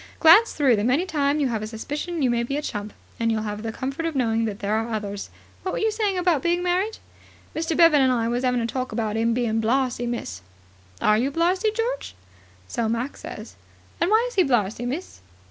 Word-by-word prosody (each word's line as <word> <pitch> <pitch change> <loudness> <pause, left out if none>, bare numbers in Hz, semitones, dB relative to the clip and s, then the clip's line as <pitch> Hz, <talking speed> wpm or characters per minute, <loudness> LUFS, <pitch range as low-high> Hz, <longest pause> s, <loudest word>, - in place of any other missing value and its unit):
Glance 360 +8 +7
through 265 -6 +3
them 210 +4 +1
any 295 +8 +2
time 290 -4 0
you 275 -3 +1
have 220 -3 -2
a 215 - -4
suspicion 295 +8 -4
you 250 - +3
may 235 0 +1
be 275 +4 -2
a - - -1
chump, 205 -5 -4 0.3
and 230 0 +1
you'll 215 -1 -1
have 210 0 -4
the 225 0 -3
comfort 270 +8 -3
of 325 - -4
knowing 230 -3 +1
that 210 -3 -3
there 205 0 -2
are 225 +1 -1
others. 205 -2 -4 0.3
What 375 - -3
were - - -2
you 440 0 +1
saying 420 -3 0
about 350 -6 +2
being 345 +2 +1
married?" 370 +5 0 0.6
"Mr. 320 0 -1
Bevan 330 -4 +6
and 260 -1 +4
I 230 -2 +1
was 240 +2 -1
'aving 250 -1 +1
a - - -1
talk 255 +2 -3
about 220 -1 -2
'im 230 +1 +1
being 225 -2 0
blarzy, 245 +1 0
miss." 235 - -4 0.6
"Are 210 0 +4
you 260 +4 +1
blarzy, 355 +8 +1
George?" 465 +3 -3 0.5
"So 225 - -1
Mac 235 +5 -2
says." - - -9 0.5
"And 340 - +2
why 440 +3 +4
is - - -8
he 380 - +4
blarzy, 240 - 0
miss?" 280 - -5
255 Hz, 225 wpm, -24 LUFS, 225-335 Hz, 0.6 s, Glance